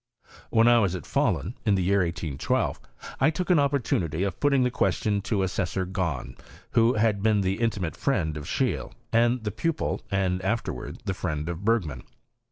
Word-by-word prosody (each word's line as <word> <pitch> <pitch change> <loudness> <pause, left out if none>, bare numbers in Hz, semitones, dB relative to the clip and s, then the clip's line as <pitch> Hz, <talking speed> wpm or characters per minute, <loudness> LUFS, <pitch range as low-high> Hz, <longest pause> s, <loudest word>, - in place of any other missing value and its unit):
When 115 +1 +4
I 120 0 +6
was 95 -5 +1
at 90 - -6
Fahlun, 105 - 0
in 105 -4 +3
the 95 - +1
year 100 +3 +3
1812, 85 -5 -1 0.4
1 155 - +4
took 180 +3 -1
an 175 - +5
opportunity 105 - 0
of 100 -3 -3
putting 140 -3 +3
the 125 - +1
question 105 -4 +1
to 100 -1 0
Assessor 95 0 -1
Gahn, 90 -8 -3 0.4
who 115 +2 +4
had 105 -2 +2
been 105 -1 +3
the 95 +2 -1
intimate 105 -8 -1
friend 85 - 0
of 75 -1 -6
Scheele, 130 +7 -1 0.2
and 120 +1 +3
the 105 - -2
pupil, 160 - -1
and 95 -2 0
afterwards 110 +5 -3
the 95 - -1
friend 80 -4 -3
of 85 +2 -4
Bergman. 90 - 0
100 Hz, 175 wpm, -26 LUFS, 90-115 Hz, 0.4 s, I